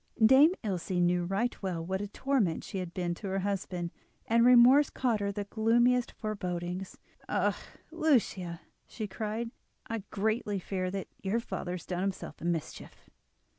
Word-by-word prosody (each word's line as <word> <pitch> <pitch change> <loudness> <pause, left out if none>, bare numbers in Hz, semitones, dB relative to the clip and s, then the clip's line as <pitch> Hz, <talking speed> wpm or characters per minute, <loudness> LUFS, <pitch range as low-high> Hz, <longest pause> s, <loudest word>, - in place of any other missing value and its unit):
Dame 275 +8 +7
Ilse 190 -5 -3
knew 175 -1 +2
right 200 +7 -1
well 175 -4 -3
what 190 +2 -2
a 205 - -3
torment 220 -6 0
she 195 - -5
had 180 -2 -5
been 175 -1 -2
to 195 +4 -7
her 190 0 -1
husband, 185 -3 -2 0.3
and 230 +1 +4
remorse 250 +4 +7
caused 240 -5 0
her 200 0 -1
the 205 +1 -3
gloomiest 235 +4 +2
forebodings. 180 -3 -4 0.3
"Ah! - - +1 0.4
Lucia," 235 - +1 0.3
she 220 - -5
cried, 220 +3 -4 0.3
"I 225 0 -3
greatly 215 0 -1
fear 185 0 -2
that 195 0 -4
your 200 +4 0
father 185 -6 -4
has 180 - -6
done 180 -1 -3
himself 190 -5 -4
a - - -5
mischief." 170 -3 -4
200 Hz, 160 wpm, -30 LUFS, 180-230 Hz, 0.4 s, Dame